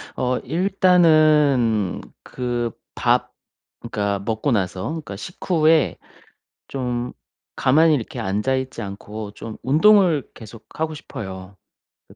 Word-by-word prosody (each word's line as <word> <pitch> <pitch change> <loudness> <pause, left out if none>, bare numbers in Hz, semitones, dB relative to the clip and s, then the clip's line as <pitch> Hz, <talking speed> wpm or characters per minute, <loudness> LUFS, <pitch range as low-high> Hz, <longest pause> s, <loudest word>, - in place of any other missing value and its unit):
어 125 0 0
일단은 155 - +3 0.2
그 120 -2 -3 0.3
밥 - - +2 0.5
그러니까 100 -3 -2
먹고 110 +5 -1
나서 95 -3 -1
그러니까 155 -11 -6
식후에 160 - +1 0.7
좀 125 -2 -3 0.4
가만히 155 +4 +4
이렇게 125 -1 -4
앉아 105 +5 0
있지 130 -2 -5
않고 105 +1 -7
좀 110 0 -9
운동을 165 - +4
계속하고 115 +8 -7
싶어요. 95 -7 -8 0.6
그 - - -17
125 Hz, 225 characters per minute, -22 LUFS, 110-155 Hz, 0.7 s, 가만히